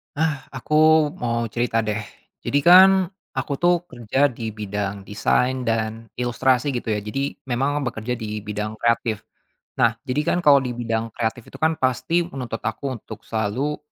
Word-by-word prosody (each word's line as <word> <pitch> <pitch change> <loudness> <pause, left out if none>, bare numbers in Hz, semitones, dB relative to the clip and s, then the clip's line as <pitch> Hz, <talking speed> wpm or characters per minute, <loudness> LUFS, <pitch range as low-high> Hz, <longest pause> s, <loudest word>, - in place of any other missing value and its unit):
Ah, 145 -2 -1
aku 130 +3 -5 0.5
mau 115 -1 -1
cerita 115 -1 0
deh. 105 0 -1 0.4
Jadi 145 - 0
kan 185 +2 +9 0.5
aku - - -3
tuh 175 -1 +3
kerja 130 +5 +1
di 115 -2 -5
bidang 100 -1 -4
desain 125 +5 0
dan 115 0 -1
ilustrasi 125 +3 +1
gitu 120 -2 -3
ya, 105 - -1
jadi 135 +7 -3
memang 140 +4 0
bekerja 120 0 -3
di 105 -2 -4
bidang 105 +1 -4
kreatif. 115 -2 +1 0.6
Nah, 115 -1 +4
jadi 130 +3 0
kan - - +2
kalau 145 -1 +8
di 125 - -3
bidang 115 -1 -2
kreatif 115 0 -3
itu - - -11
kan 160 +1 +3
pasti 130 +7 +1
menuntut 130 -8 -5
aku 135 -2 -3
untuk - - -11
selalu 115 +7 -1
120 Hz, 160 wpm, -23 LUFS, 110-140 Hz, 0.6 s, kan